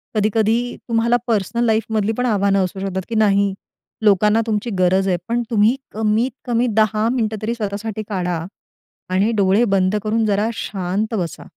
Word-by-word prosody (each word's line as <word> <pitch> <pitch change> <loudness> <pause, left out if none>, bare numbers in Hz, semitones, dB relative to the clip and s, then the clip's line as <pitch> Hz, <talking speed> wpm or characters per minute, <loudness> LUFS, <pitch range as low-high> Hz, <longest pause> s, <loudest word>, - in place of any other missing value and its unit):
कधी-कधी 220 +3 +1
तुम्हाला 230 +1 +2
पर्सनल 230 +1 0
लाईफमधली 220 -1 +1
पण 250 - 0
आव्हानं 200 -4 +2
असू 185 +1 -7
शकतात, 190 -1 -3
की 230 - -3
नाही 200 -2 +3 0.5
लोकांना 210 +2 +4
तुमची 215 +2 -1
गरज 190 +2 +3
आहे. 180 - +1
पण 235 +1 0
तुम्ही 220 +2 +3 0.2
कमीत 220 +4 +1 0.2
कमी 240 +1 +1
10 215 0 +2
मिनिटं 220 -4 -1
तरी 220 +2 -1
स्वतःसाठी 215 0 -4
काढा 180 -4 -2 0.7
आणि 200 +4 +2
डोळे 195 +3 +3
बंद 185 +1 +2
करून 220 +1 +1
जरा 210 +1 +1
शांत 200 +2 -3
बसा. 170 -5 -4
215 Hz, 155 wpm, -20 LUFS, 195-225 Hz, 0.7 s, लोकांना